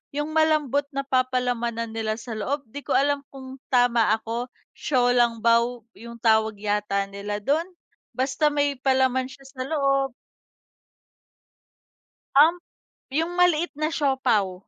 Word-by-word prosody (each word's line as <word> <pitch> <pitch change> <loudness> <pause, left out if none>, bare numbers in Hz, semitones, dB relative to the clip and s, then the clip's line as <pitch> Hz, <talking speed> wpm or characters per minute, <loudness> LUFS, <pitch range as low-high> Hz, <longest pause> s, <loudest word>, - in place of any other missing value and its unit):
yung 295 +1 -2
malambot 305 -3 +2
na 275 - -1
papalamanan 250 -3 -1
nila 220 -1 -2
sa 230 +1 -9
loob. 265 +6 -3
'Di 285 - -6
ko - - +1
alam 285 +1 +2
kung 265 -1 -11
tama 240 -4 +3
ako, 230 +2 -4 0.2
小 250 -3 +1
笼 235 -2 +2
包 235 0 +2 0.2
yung 235 +1 -9
tawag 220 -1 +2
yata 205 -1 0
nila 205 +1 -5
dun. 310 - +1 0.5
Basta 265 +4 +1
may 285 -2 0
palaman 260 -1 +2
siya 270 +1 -14
sa 265 -1 -9
loob. 275 -3 +1 2.2
Um, 315 +5 +7 0.5
yung 325 +6 -2
maliit 350 -1 +3
na 310 - +1
siopao 250 - 0
255 Hz, 130 wpm, -24 LUFS, 230-285 Hz, 2.2 s, Um